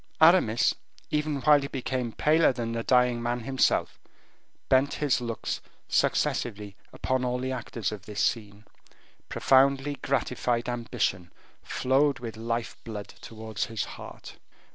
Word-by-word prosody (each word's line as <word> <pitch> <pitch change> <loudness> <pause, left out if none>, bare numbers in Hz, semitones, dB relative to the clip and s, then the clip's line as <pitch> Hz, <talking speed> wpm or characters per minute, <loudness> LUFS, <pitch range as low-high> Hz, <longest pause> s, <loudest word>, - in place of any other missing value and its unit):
Aramis, 160 -9 +5 0.4
even 150 -2 0
while 150 0 +6
he 140 - -3
became 130 -3 -3
paler 155 +1 +4
than 120 -2 -4
the 115 0 -2
dying 125 0 +3
man 120 +1 -1
himself, 130 +3 +1 0.7
bent 135 +2 +3
his 140 -5 +1
looks 115 -2 -3 0.3
successively 105 -3 0 0.2
upon 130 -1 -1
all 125 0 0
the 130 +1 -3
actors 115 -4 -3
of 105 -2 -8
this 105 -1 -5
scene. 105 -2 -2 0.6
Profoundly 140 +1 +3
gratified 125 -2 0
ambition 115 -7 -2 0.3
flowed 135 +2 +1
with 115 -2 -7
life 115 +1 -3
blood 105 -3 -7
towards 110 -2 -6
his 115 -2 -3
heart. - - -10
120 Hz, 130 wpm, -27 LUFS, 115-135 Hz, 0.7 s, while